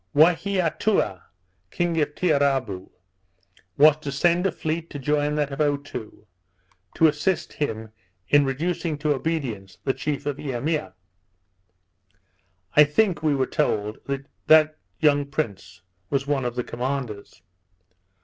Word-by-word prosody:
Waheatoua, 175 - +2 0.5
king 170 - 0
of 150 0 -1
Tiarabou, 135 - +1 0.9
was 150 +1 +7
to 150 -2 -5
send 175 +6 +2
a - - -1
fleet 160 +1 -3
to - - -7
join 150 +1 0
that 145 -1 0
of 135 - -6
Otoo, 140 -7 -3 0.7
to 165 - +4
assist 155 +4 +1
him 110 -7 -3 0.4
in 145 0 +5
reducing 160 +4 -2
to 150 0 +1
obedience 130 - -3
the 135 - +1
chief 145 0 -3
of 145 -1 -2
Eimea. 135 - -2 1.8
I 150 - +9
think, 165 +3 +1
we 155 -2 +2
were 135 -1 +1
told, 110 -9 -1 0.5
that 155 -1 +6 0.2
young 145 -2 +4
prince 95 - -4 0.3
was 135 0 0
one 140 -3 0
of 120 -1 -2
the 125 - -1
commanders. 120 -8 -5
145 Hz, 125 wpm, -24 LUFS, 130-155 Hz, 1.8 s, I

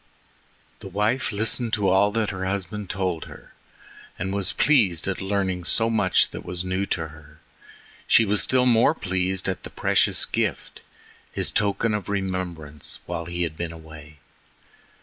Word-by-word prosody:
The - - -9
wife 105 +8 0
listened 115 +2 -1
to 105 -3 +2
all 95 +2 +4
her 100 -4 -1
husband 100 +1 -3
told 95 -4 -2
her, - - -13 0.6
and 95 +2 -2
was 100 -2 +1
pleased 105 - +3
at 95 0 -2
learning 95 -2 -1
so 115 +5 +2
much 100 -5 +3
that - - -7
was 90 0 -3
new 95 +2 -1
to 80 -2 -2
her. 75 0 -16 0.7
She 115 - +6
was 105 0 +3
still 130 -1 +2
more 120 -2 +4
pleased 95 0 -1
at 95 - -2
the - - -9
precious - - +2
gift—his - - -4
token 105 +2 +1
of 105 -2 -3
remembrance 90 -7 -3
while 85 -1 -4
he 85 0 -2
had 80 -2 -3
been 85 0 -4
away. 80 -2 -12
95 Hz, 150 wpm, -24 LUFS, 85-105 Hz, 0.7 s, She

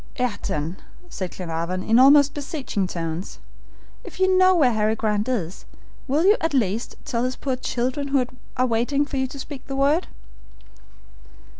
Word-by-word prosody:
"Ayrton," 190 - -2 0.3
said 185 -2 -4
Glenarvan, 175 +1 -3
in 225 +2 +4
almost 285 +2 +7
beseeching 275 - -3
tones, 165 0 -5 0.7
"if - - -11
you 375 0 +3
know 370 0 +5
where 280 -8 +4
Harry 215 0 +1
Grant 215 +1 -1
is, 190 -9 -3 0.4
will 295 +6 +2
you, 415 +4 +6
at 325 -3 0
least, 225 -2 0
tell 245 -6 -1
his 255 +1 -1
poor 265 -2 -2
children, 255 +2 -2
who 275 -2 +2 0.3
are 255 - +3
waiting 250 +5 +1
for 285 - -5
you 265 0 0
to 275 - -10
speak 275 0 -8
the 270 - -4
word?" 285 +6 +2
255 Hz, 160 wpm, -23 LUFS, 210-285 Hz, 0.7 s, almost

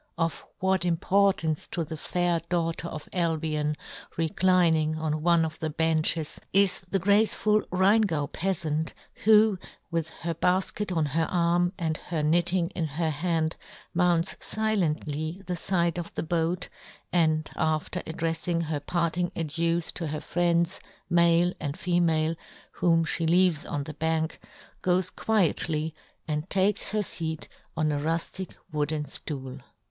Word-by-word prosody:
Of 165 -1 -1
what 190 0 +1
importance 175 -2 +1
to 170 - -2
the 160 +1 -6
fair 175 +2 0
daugh 165 -2 0
ter 170 - -5
of 155 -2 -7
Albion, 155 -3 0 0.4
reclining 165 -2 +2
on 155 -1 -2
one 170 0 +4
of 155 -1 -6
the 160 - -2
benches, 160 0 +1
is 195 -1 +4
the 195 - +1
graceful 210 +2 +3
Rheingau 190 -4 +3
peafant, 160 -2 -1 0.3
who, 215 -2 +6 0.3
with 165 -1 -1
her 170 0 -1
balket 185 +4 0
on 160 - +2
her 160 +3 0
arm, 175 +1 +2
and 160 -2 -1
her 160 -3 -3
knitting 175 +3 +2
in 170 - -2
her 155 +2 -1
hand, 160 +1 -1 0.4
mounts 175 -1 +3
filently 170 -5 -1
the 180 0 -2
fide 170 -1 +1
of 170 - -6
the - - -2
boat, 170 +2 -1 0.5
and 155 -3 +2
after 155 +3 -1
addreffing 165 +1 -1
her 155 -2 -2
parting 170 +3 -1
adieus 165 +1 0
to 165 - -4
her 150 0 -3
friends, 170 +1 +1 0.3
male 170 +1 +4
and 145 +1 -3
female, 165 -3 +1 0.4
whom 165 -1 +2
fhe 165 0 0
leaves 175 -3 +3
on 145 - -2
the 155 - -7
bank, 160 0 -1 0.4
goes 185 0 +1
quietly 160 -6 +1 0.3
and 150 +3 -2
takes 195 +2 +2
her 215 0 0
feat 160 -4 -3 0.3
on 155 -1 +1
a 145 - -1
ruflic 165 +4 -2 0.2
wooden 150 0 -1
ftool. 135 -3 -3
165 Hz, 140 wpm, -27 LUFS, 155-180 Hz, 0.5 s, who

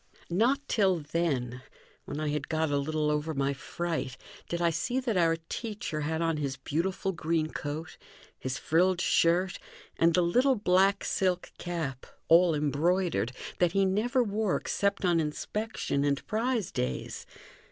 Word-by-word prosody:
Not 250 +10 +2
till 195 -4 +3
then, 140 -6 -1 0.4
when 145 - -5
I 155 -1 -1
had 145 -1 -2
got 160 -1 0
a 145 - +2
little 150 +1 0
over 150 +1 -1
my 140 0 +1
fright, 160 -2 -4 0.3
did 170 - -2
I 170 -1 +3
see 245 +10 -1
that 245 -5 -1
our 165 -2 +4
teacher 210 -9 -4
had 160 +2 -1
on 165 -1 +1
his 140 -2 -2
beautiful 175 +7 -1
green 165 -2 -1
coat, 155 +2 -5 0.4
his 130 0 -3
frilled 180 +3 +2
shirt, 180 +2 +2 0.4
and 165 0 +4
the 180 - +4
little 250 +10 +3
black 195 -1 +3
silk 185 -2 0
cap, 160 -7 -4 0.2
all 170 0 +6
embroidered, 150 0 +1 0.3
that 175 -1 +3
he 195 0 +3
never 235 +7 +2
wore 210 -2 0
except 200 -1 0
on 175 -2 +3
inspection 160 0 -2
and 140 -1 0
prize 225 -2 -1
days. 65 0 -3
170 Hz, 150 wpm, -29 LUFS, 150-190 Hz, 0.4 s, all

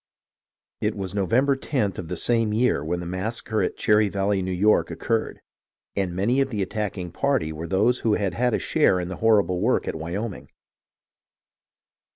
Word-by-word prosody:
It - - 0
was 95 -2 -4
November 120 +8 +2 0.2
loth 105 -9 +1
of 90 - -6
the 90 - -4
same 115 +1 +1
year 110 - +2
when 85 +3 -2
the - - -6
massacre 110 +5 -2
at - - -2
Cherry 105 -1 +3
Valley, 100 0 0
New 95 0 -3
York, 100 +4 +3
occurred; 115 -1 -2 0.5
and 95 -3 -1
many 120 +9 +2
of 135 - 0
the 105 -5 -1
attacking 95 -3 -4
party 135 - 0
were 80 +2 -6
those 105 +8 +2
who 110 -2 +2
had 100 -4 -1
had 125 -1 +1
a - - +1
share 90 - +2
in 90 0 -4
the 95 - -5
horrible 100 -5 +2
work 120 +5 +1
at - - -1
Wyoming. 90 +7 -5
100 Hz, 180 wpm, -24 LUFS, 90-115 Hz, 0.5 s, Cherry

